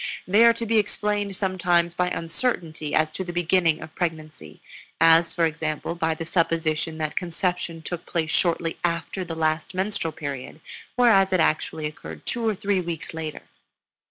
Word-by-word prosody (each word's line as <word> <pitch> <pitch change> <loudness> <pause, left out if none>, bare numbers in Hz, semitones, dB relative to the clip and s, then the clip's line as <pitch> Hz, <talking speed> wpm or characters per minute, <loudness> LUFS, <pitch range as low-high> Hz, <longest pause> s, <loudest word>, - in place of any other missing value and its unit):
They 205 +5 +5
are 235 - +7
to 230 0 -4
be 225 0 +3
explained 205 -1 -1
sometimes 175 -3 +1
by 180 +1 +1
uncertainty 165 - -2
as 155 0 +2
to 190 - -4
the 175 - -5
beginning 170 -2 +2
of 155 - -11
pregnancy, 160 -3 -4 0.4
as 165 +1 +6
for 170 -2 +2
example 160 0 -2
by 160 -1 0
the 165 - -5
supposition 165 -2 0
that 155 -1 -3
conception 175 -2 -2
took 175 0 -5
place 160 -2 -1
shortly 165 -2 +1
after 170 +2 -1
the 165 -2 -5
last 160 +2 -1
menstrual 190 -4 -1
period, 140 -1 -6 0.4
whereas 220 -6 +5
it 185 - +3
actually 155 -1 +1
occurred 80 - -7
two 235 -1 -1
or 215 - 0
three 200 -1 0
weeks 165 -4 -5
later. 160 -1 -5
165 Hz, 165 wpm, -25 LUFS, 160-185 Hz, 0.4 s, are